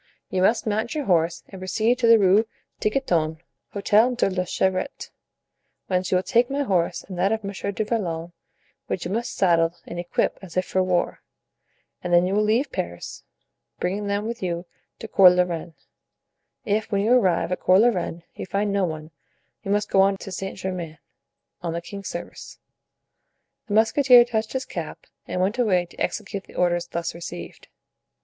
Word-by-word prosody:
You 185 - 0
must 220 +5 +3
mount 220 +5 -1
your 295 -2 -2
horse 170 -3 +1
and 190 -2 -10
proceed 220 +7 +1
to 235 - +3
the 230 0 +8
Rue 200 +2 +4 0.3
Tiquetonne, 170 - 0 0.3
Hotel 215 +4 +3
de 215 -5 +1
la 185 -1 -1
Chevrette, 185 +1 -2 0.7
whence 185 -1 -1
you - - +3
will 180 - -1
take 240 +2 +2
my 280 +1 0
horse 180 -9 0
and 185 -2 -8
that 195 +3 +2
of 220 -1 -1
Monsieur 200 0 -4
du 215 +2 -2
Vallon, 175 -7 -2 0.5
which 180 - -3
you 180 - -3
must 235 +3 -2
saddle 170 -3 +3
and 175 - -6
equip 175 0 -1
as 185 -2 -9
if 185 - +2
for 185 - 0
war, 180 -1 0 0.8
and 180 - -3
then 175 +1 +5
you 185 - -1
will 210 - +3
leave 225 +7 +1
Paris, - - -5 0.6
bringing 200 +3 -2
them 200 +1 -1
with 235 +1 -5
you 175 -1 -2 0.3
to 225 - -8
Cours 185 -4 +7
la 180 - +4
Reine. 170 -2 -5 0.9
If, 215 +2 -1
when 200 -1 +1
you 220 +4 +1
arrive 185 -8 +2
at 180 - -1
Cours 185 +3 +5
la 240 - +6
Reine, 175 -5 -3
you - - -7
find 200 +1 -1
no 200 -2 +2
one, 155 -1 -6 0.5
you 195 - -7
must 205 +1 0
go 195 - +5
on 195 0 +3
to 195 - -8
Saint 190 +1 -5
Germain. 180 -4 -5 0.6
On 170 -2 -3
the 170 - -2
king's 195 +3 -8
service." 170 - -8 1.1
The 205 - -1
musketeer 240 +2 +6
touched 220 -2 -2
his 260 0 -2
cap - - -7 0.2
and - - -3
went 200 +6 0
away 185 -7 +3
to 175 - -19
execute 200 -2 -3
the - - -17
orders 175 -1 +1
thus 170 0 -3
received. 130 - -8
190 Hz, 185 wpm, -24 LUFS, 175-215 Hz, 1.1 s, the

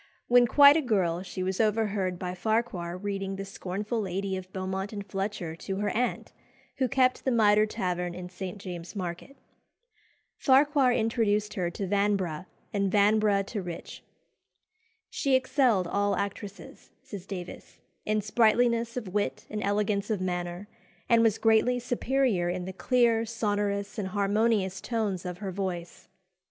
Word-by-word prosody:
When 245 0 +6
quite 285 +4 +8
a 320 - +3
girl 185 - 0
she 185 0 -5
was 190 +3 0
overheard 210 -4 0
by 180 0 -4
Farquhar 185 -4 -1
reading 195 0 -3
"The 195 0 -5
Scornful 200 +4 -4
Lady" 195 0 -2
of 185 0 -7
Beaumont 190 +1 -3
and 205 -2 -6
Fletcher 195 -3 -4
to 195 +3 -4
her 205 +1 -1
aunt, 245 +2 -2 0.4
who 260 - +2
kept 255 -1 +2
the - - +1
Mitre 215 -3 +4
Tavern 180 -4 -2
in 180 0 -6
St. 185 +1 -7
James's 180 -3 -8
Market. 180 +8 -6 1.0
Farquhar 275 -1 +4
introduced 220 -3 +1
her 180 -3 -1
to 195 +3 -4
Vanbrugh, 190 -4 0 0.3
and 200 -2 0
Vanbrugh 205 -1 +3
to 205 0 -4
Rich. 175 -2 -8 1.1
"She 275 -2 +1
excelled 255 - +2
all 200 +3 0
actresses," 200 +1 -6
says 195 -3 -9
Davies, 180 -2 -8 0.3
"in 215 0 0
sprightliness 235 +2 +2
of 205 -7 -5
wit 205 0 -1
and 210 0 -3
elegance 205 0 0
of 215 -3 0
manner, 180 +1 -3 0.4
and 230 -1 +5
was 225 -2 +3
greatly 225 +3 +3
superior 245 -6 0
in 180 0 -3
the 190 - -6
clear, 235 +1 +2
sonorous, 205 -2 -2
and 195 - -2
harmonious 200 -1 +1
tones 205 -6 -2
of 180 -1 -5
her 195 -1 -5
voice." 180 -3 -5
205 Hz, 150 wpm, -28 LUFS, 185-225 Hz, 1.1 s, quite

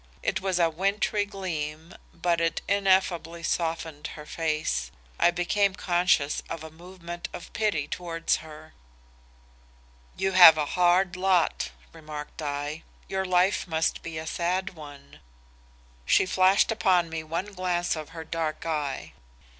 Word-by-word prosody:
It - - 0
was 190 -2 0
a 170 -1 +4
wintry 195 +5 0
gleam 165 -4 -5 0.2
but 170 0 0
it 165 -1 0
ineffably 185 -4 +1
softened 165 -3 -2
her 150 - -9
face. 155 - -1 0.3
I 170 - +5
became 185 +3 +1
conscious 175 -5 +1
of 160 - -5
a 160 - -9
movement 175 +1 -8
of 175 - -9
pity 200 -10 0
towards 165 -2 -1
her. 155 0 -12 1.4
"'You 190 +1 0
have 175 -4 +10
a 150 - +1
hard 180 +1 +3
lot,' 185 -2 +1 0.2
remarked 155 -1 -8
I. 145 +1 -3 0.3
'Your 190 0 -2
life 185 +2 +2
must 160 -1 0
be 165 -1 -6
a 160 - -5
sad 180 +4 -1
one.' 145 - -13 0.8
"She - - +4
flashed 185 +3 +4
upon 185 -6 +3
me 165 0 -4
one 170 +6 -4
glance 180 -2 0
of 155 -2 -7
her 165 -1 -8
dark 160 -1 -3
eye. 150 -4 -3
170 Hz, 140 wpm, -27 LUFS, 155-185 Hz, 1.4 s, have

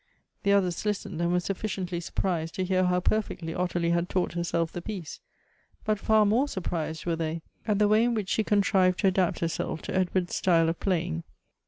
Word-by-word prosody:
The 200 - +3
others 185 -4 +1
listened, 200 -5 -2
and 170 0 +1
were 180 - +3
sufficiently 185 -1 -3
surprised 170 -1 -2
to 185 - -1
hear 185 0 +2
how 180 0 +2
perfectly 180 -6 -1
Ottilie 175 -1 0
had 170 +1 +1
taught 180 -2 0
herself 170 -1 -1
the 175 - -5
piece 180 -5 -6 0.3
— - - -33
but 215 -2 +1
far 215 +1 +4
more 235 +8 +3
surprised 165 - -3
were 170 -1 +1
they 160 0 -3 0.2
at 210 -2 +2
the 210 0 +4
way 215 +2 +4
in 240 -1 +1
which 205 -4 -2
she 220 - +2
contrived 195 -3 +3
to - - +4
adapt 185 -2 0
herself 165 -1 -2
to - - -4
Edward's 185 -1 0
style 165 -3 +3
of 165 - -3
playing. 170 -3 -1
180 Hz, 200 wpm, -27 LUFS, 170-200 Hz, 0.3 s, far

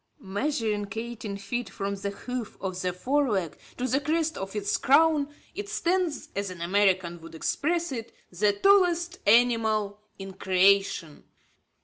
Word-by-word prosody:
Measuring 210 -1 -2
eighteen 225 -3 -5
feet 240 +5 -4
from 200 -1 -3
the 200 0 -4
hoof 245 +3 -6
of 185 -1 -4
the 180 - 0
fore 265 +9 0
leg 190 -7 -1 0.2
to 250 - -1
the 260 +3 +2
crest 320 +2 0
of 195 +2 -6
its 205 -1 0
crown, 295 +1 +4 0.2
it 405 +3 -6
stands, 355 -6 -1
as 200 0 -2
an 180 -2 -9
American 180 -1 +1
would 165 0 -11
express 335 - -1
it, 230 -3 -5 0.2
"The 205 +4 +2
tallest 355 - +3
animal 220 -2 +3 0.2
in 195 -1 -8
creation." 190 -4 +2
215 Hz, 145 wpm, -27 LUFS, 195-285 Hz, 0.2 s, crown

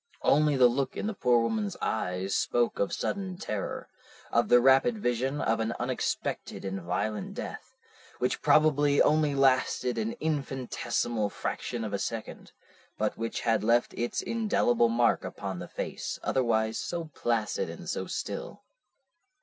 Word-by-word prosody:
Only 150 -1 +4
the 125 - +6
look 130 +2 -1
in - - -2
the 220 - -1
poor 125 -10 +3
woman's 205 - -1
eyes 95 -2 -2
spoke 120 -1 +1
of 100 - +1
sudden 190 -2 -3
terror, 105 - -4 0.4
of - - +2
the 125 - +7
rapid 135 - +4
vision 130 - -1
of 115 0 +1
an 115 +1 -1
unexpected 125 -4 -3
and 95 0 -3
violent 110 - -2
death, 250 +1 -7 0.4
which 125 - -1
probably 145 -2 +4
only 150 -1 +3
lasted 130 -2 +2
an 220 +1 -1
infinitesimal 135 - -2
fraction 120 +3 -4
of 105 -2 -4
a 100 - 0
second, 115 +2 -5 0.5
but 110 0 0
which 115 0 -3
had 115 -2 +1
left 115 +2 +2
its 120 0 -2
indelible 120 - +2
mark 115 0 +2
upon - - -5
the - - -6
face, - - -4
otherwise 110 -3 +1
so 170 -2 -4
placid 115 -3 -1
and - - -9
so - - -3
still." - - -5
125 Hz, 150 wpm, -29 LUFS, 115-155 Hz, 0.5 s, the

